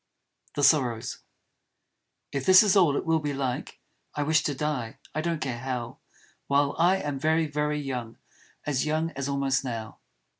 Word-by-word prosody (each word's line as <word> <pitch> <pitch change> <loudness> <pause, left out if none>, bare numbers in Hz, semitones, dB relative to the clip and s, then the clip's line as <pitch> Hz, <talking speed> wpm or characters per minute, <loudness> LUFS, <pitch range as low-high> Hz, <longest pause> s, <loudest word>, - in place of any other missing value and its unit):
The 145 - -1
Sorrows 130 -6 +2 1.1
If 140 -2 -2
This 185 +2 +9
is 205 -2 +3
all 165 -8 +4
it - - -3
will 160 0 +2
be 145 -2 -3
like, 130 -2 -3 0.4
I 145 - 0
wish 160 +2 +3
to 145 - -1
Die; 135 -6 -3 0.2
I 155 - -1
don't 165 -1 -1
care 125 -4 -3
how 125 -2 -4 0.5
While 140 0 +2
I 175 +3 +5
am 145 -7 -3
very, 160 +2 +2
very 150 0 -1
young; 125 -5 -5 0.5
As 145 0 0
young 160 +2 0
as 140 -1 -4
almost 140 -1 0
Now. 115 -4 -5
145 Hz, 165 wpm, -27 LUFS, 130-155 Hz, 1.1 s, This